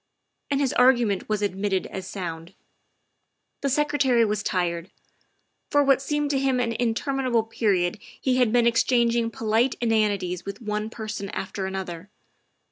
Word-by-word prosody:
And 280 -1 +1
his 275 -3 +1
argument 240 -7 +3
was 210 -1 0
admitted 195 -1 -1
as 190 -1 -7
sound. 170 -4 -6 1.1
The 280 - 0
Secretary 270 -4 +2
was 210 0 -1
tired. 175 -2 -1 0.8
For 290 -1 +4
what 275 -1 +4
seemed 295 +1 -1
to 275 - +1
him 265 -2 +1
an 235 -2 0
interminable 245 +1 0
period 200 -5 0 0.2
he 255 -1 +1
had 245 -4 +3
been 240 0 +3
exchanging 235 0 +2
polite 230 +3 +1
in 235 - 0
anities 200 -5 0
with 200 +1 -7
one 210 -1 -3
person 215 -3 -5
after 190 0 -4
another. 190 -1 -6
225 Hz, 145 wpm, -25 LUFS, 195-255 Hz, 1.1 s, For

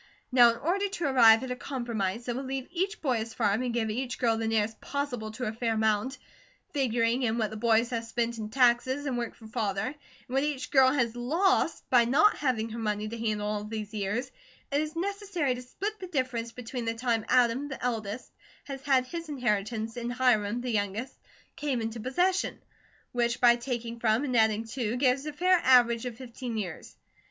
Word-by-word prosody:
Now 245 -2 +7
in 230 - -6
order 390 +9 0
to 380 -4 -3
arrive 235 -4 +6
at 260 - -4
a - - -1
compromise 235 -5 -3
that 240 - -2
will 260 - -3
leave 265 -1 -4
each 380 +3 -2
boy 255 -5 +2
his 225 0 -5
farm, 215 -1 +1
and 250 -1 -1
give 225 -2 -1
each 245 +2 -3
girl 230 -2 +2
the 225 0 -2
nearest 220 0 0
possible 260 -6 -3
to 250 +2 -4
a 215 - -2
fair 225 0 -1
amount, 220 +4 +1 0.6
figuring 240 -3 +1
in 230 -2 0
what 215 -3 0
the - - -6
boys 230 +2 +2
have 230 -1 -2
spent 230 0 -2
in 215 -1 -4
taxes 255 +3 +2
and 265 -3 -1
work 240 -1 -3
for 225 - -15
Father, 215 -4 -2
and 265 +4 -4 0.3
what 265 +2 0
each 290 -1 -3
girl 265 -2 +6
has 240 -5 0
LOST 330 +7 +1
by 245 -2 +6
not 300 - +4
having 245 -6 0
her 230 +1 -6
money 210 -1 -1
to 230 - -6
handle 215 -2 -1
all 210 0 -2
these 210 0 -6
years, 215 +5 -2 0.4
it 285 +1 +2
is 310 +1 -4
necessary 385 -6 -1
to 250 - -6
split 405 +12 -5
the 370 - -6
difference 255 -7 -2
between 245 0 -6
the 230 0 -1
time 230 -2 0
Adam, 255 +2 +3
the 270 -3 -7
eldest, 225 -1 -3 0.3
has 270 -2 -7
had 265 -2 +3
his 335 +4 -6
inheritance, 225 -3 -1
and 240 0 -3
Hiram, 240 -3 +2
the 250 0 -3
youngest, 210 +3 -2 0.4
came 280 -4 -1
into 225 +1 -4
possession, 360 - 0 0.5
which 235 -1 0
by 240 -1 +6
taking 235 -1 -4
from 225 +2 +2
and 255 -4 -1
adding 220 -1 +3
to, 235 -2 -2
gives 265 +2 +1
a - - -2
fair 365 +4 +4
average 245 -2 +5
of 235 -2 -7
fifteen 245 -2 -6
years. 185 -6 -6
240 Hz, 205 wpm, -28 LUFS, 225-265 Hz, 0.6 s, Now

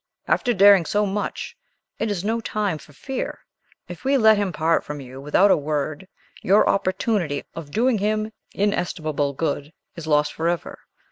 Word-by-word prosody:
"After 245 - +2
daring 200 -5 +6
so 210 0 +1
much, 205 - -4 0.4
it 220 - -1
is 195 -3 -2
no 225 +2 0
time 205 -7 -2
for 150 - -16
fear! 265 - -5 0.5
If 175 +3 -9
we 275 +1 +3
let 220 -3 +6
him 200 -2 -1
part 165 0 +1
from 150 0 -6
you 130 0 -10
without 180 +8 +4
a - - +6
word, 150 +3 -3 0.3
your 200 +3 +4
opportunity 185 -5 0
of 165 -3 -8
doing 230 - +1
him 215 +1 0 0.2
inestimable 155 -7 -1
good 145 0 -2 0.2
is 165 -2 -8
lost 150 -1 +2
forever." 170 +1 -2
185 Hz, 160 wpm, -23 LUFS, 150-210 Hz, 0.5 s, daring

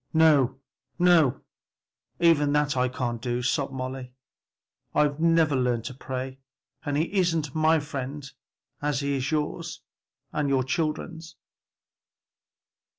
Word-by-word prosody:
"No, 140 -5 +4 0.4
no, 165 -7 +4 0.8
even 155 -4 +4
that 150 -1 +2
I 125 0 +2
can't 120 -2 -3
do," 120 0 -2
sobbed 135 +2 0
Molly, 130 -1 -5 0.8
"I've 145 0 +2
never 165 -3 +3
learned 125 -3 0
to 130 - -5
pray, 130 0 -5 0.4
and 145 -1 -1
he 155 - +3
isn't 165 -7 +1
my 160 0 +3
friend 140 -1 -5 0.5
as 145 -2 0
he 140 0 -1
is 130 +1 -2
yours 155 +2 -2 0.5
and 150 -2 0
your 135 -1 +2
children's!" 160 +3 -3
145 Hz, 120 wpm, -26 LUFS, 130-160 Hz, 0.8 s, No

